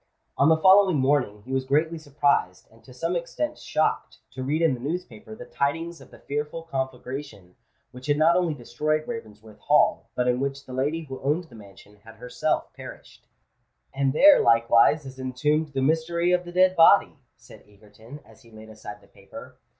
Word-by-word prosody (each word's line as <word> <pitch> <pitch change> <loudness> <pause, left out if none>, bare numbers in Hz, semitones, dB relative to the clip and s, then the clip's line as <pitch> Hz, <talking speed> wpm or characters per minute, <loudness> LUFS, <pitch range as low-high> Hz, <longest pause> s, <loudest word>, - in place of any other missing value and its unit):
On 140 - +3
the 160 - +4
following 190 0 +5
morning 130 -7 0
he 130 - -9
was 130 0 0
greatly 155 +5 0
surprised, 140 - -1
and 115 0 -22
to 130 - -16
some 165 +8 -3
extent 295 - -4
shocked, 155 - -2
to 130 0 -8
read 150 +5 -1
in 160 -4 +3
the 125 - -6
newspaper 130 -7 -6
the 120 - -11
tidings 165 +6 -3
of - - -16
the - - -16
fearful 150 +3 -5
conflagration 130 - -6 0.4
which 125 +2 -12
had 145 0 +1
not 160 +3 +4
only 175 -4 0
destroyed 150 +5 -3
Ravensworth 110 - -9
Hall, 205 - +2
but 125 0 -1
in 125 0 +1
which 140 0 -4
the 130 - -10
lady 145 +6 -2
who 135 -3 -9
owned 150 +6 0
the 135 -9 -17
mansion 105 0 -16
had 115 0 -14
herself 125 +1 -3
perished. - - -13 0.7
"And 135 0 0
there 290 - +6
likewise 115 +5 +3
is 130 0 -11
entombed 150 +4 -1
the 135 -1 -1
mystery 165 +4 0
of 180 0 +1
the 175 - -9
dead 185 +1 +3
body!" 165 -1 +5 0.2
said - - -17
Egerton, 105 +6 -15
as - - -20
he 115 - -20
laid 110 0 -14
aside 105 -1 -11
the - - -22
paper. - - -14
140 Hz, 190 wpm, -24 LUFS, 125-160 Hz, 0.7 s, there